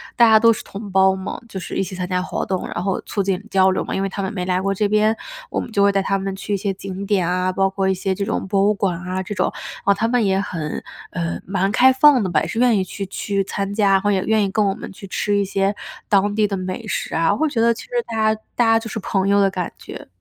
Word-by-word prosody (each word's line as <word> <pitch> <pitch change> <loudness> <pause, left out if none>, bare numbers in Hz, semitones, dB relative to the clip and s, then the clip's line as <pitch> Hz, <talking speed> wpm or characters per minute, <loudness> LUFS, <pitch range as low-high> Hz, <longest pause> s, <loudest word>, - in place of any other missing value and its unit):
大 235 -1 +6
家 220 0 +7
都 230 +1 +6
是 - - -7
同 200 0 -8
胞 190 0 +4
嘛， 190 0 -5
就 195 - -5
是 - - -7
一 - - +1
起 190 - -6
参 180 0 -3
加 180 0 0
活 185 - -3
动， 185 -1 -2
然 175 - -4
后 195 -1 -1
促 205 - -3
进 195 0 -1
交 190 -2 +4
流 185 - -1
嘛。 - - -5
因 195 - -1
为 195 - -1
他 195 - -4
们 190 - -2
没 180 -3 -3
来 180 0 +1
过 195 +1 0
这 205 +2 +1
边， 215 +1 +2 0.3
我 - - -2
们 - - -6
就 200 - +1
会 200 - +5
带 195 - +1
他 195 +1 0
们 195 0 -3
去 200 +1 -4
一 - - +2
些 200 +1 -1
景 195 0 -6
点 190 -4 +1
啊， 180 +1 0
包 195 +1 +2
括 195 0 -1
一 - - +3
些 190 +1 -1
这 200 - -3
种 - - -2
博 195 0 +2
物 205 - +4
馆 195 -3 -1
啊 185 +1 -3
这 200 - -5
种， - - 0 0.3
啊 200 - +4
他 220 +3 0
们 240 0 +2
也 190 -1 +2
很， 165 -6 -4 0.3
呃， 170 -1 -3
蛮 195 +1 0
开 260 +4 +6
放 260 -2 +5
的 185 - -1
吧， 160 -3 +2
也 - - -2
是 225 - -3
愿 245 -3 +4
意 190 - +1
去- 195 +2 -6
去 195 +1 -2
参 195 +1 -3
加， 205 -2 +3
然 195 - +4
后 205 +1 +1
也 190 -2 +1
愿 220 -1 +3
意 200 - 0
跟 215 +1 +2
我 195 - +1
们 - - -8
去 195 +1 -11
吃 205 +2 -1
一 200 - +2
些 195 +1 0 0.3
当 205 0 +2
地 215 -1 +3
的 200 - -2
美 185 +4 -5
食 - - -3
啊， 165 +2 +3
我 - - -2
会 315 - +2
觉 265 -5 -2
得 235 +1 +4
其 - - -9
实 - - -25 0.2
大 230 - -5 0.2
家 - - -16 0.2
大 245 - +3
家 225 0 +5
就 225 - -8
是 220 - -4
朋 195 -1 -1
友 200 0 +4
的 195 - +4
感 180 -2 -4
觉。 - - -10
195 Hz, 325 characters per minute, -21 LUFS, 190-210 Hz, 0.3 s, 家